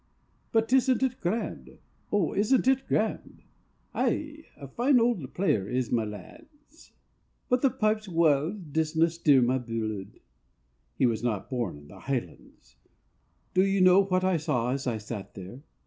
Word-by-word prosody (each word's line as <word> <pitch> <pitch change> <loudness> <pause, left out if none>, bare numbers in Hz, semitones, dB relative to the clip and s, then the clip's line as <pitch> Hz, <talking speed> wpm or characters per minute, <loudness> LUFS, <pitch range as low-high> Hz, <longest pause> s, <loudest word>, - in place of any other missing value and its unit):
"But 225 +2 +1
isn't 260 0 +3
it 260 -1 -1
grand? 205 +7 -3 0.3
O, 200 -6 +1
isn't 245 +6 +2
it 265 0 +2
grand?" 220 - -2 0.5
"Ay, 305 +1 -2
a 140 - -9
fine 245 - +2
auld 230 - 0
player 110 - +1
is 125 -1 -2
Mylands, 295 - -7 0.6
But 250 0 +2
the 275 - +4
pipes' 215 -4 -1
wild 160 -1 +2
sound 150 -4 -14
disna 160 +1 +1
stir 150 -6 +4
my 130 +2 +1
bluid" 110 -5 -5 0.8
He - - +3
was 115 -3 0
not 115 -1 -3
born 120 - -2
in 75 0 -15
the 95 0 -13
highlands. 130 0 -6 0.8
Do 185 - +4
you 195 0 +1
know 185 +1 +6
what 185 -1 0
I 185 -2 +2
saw 125 -5 -1
as 135 0 -3
I 115 -3 0
sat 105 -1 -8
there? 95 +7 -9
165 Hz, 155 wpm, -27 LUFS, -, 0.8 s, know